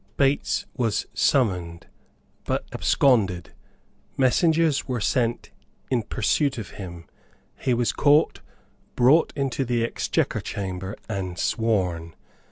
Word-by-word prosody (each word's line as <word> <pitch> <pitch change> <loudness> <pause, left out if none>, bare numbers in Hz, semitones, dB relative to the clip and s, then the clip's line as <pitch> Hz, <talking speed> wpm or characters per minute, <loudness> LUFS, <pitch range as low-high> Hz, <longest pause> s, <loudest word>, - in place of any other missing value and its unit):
Bates 140 +1 +1
was 115 -5 0
summoned, 90 -10 +1 0.6
but - - -1
absconded; 100 -10 +2 0.6
messengers 160 +3 +2
were 125 -2 -2
sent 120 +2 0 0.4
in 125 -2 +2
pursuit 130 +6 0
of 110 -6 -6
him; 85 -4 -9 0.5
he 125 - +1
was 120 0 0
caught, 145 +2 +3 0.6
brought 135 +7 +4
into 135 -2 -1
the 120 -2 0
Exchequer - - -1
Chamber 95 0 -5
and 95 -4 -4
sworn. 90 -7 -1
115 Hz, 105 wpm, -24 LUFS, 95-135 Hz, 0.6 s, brought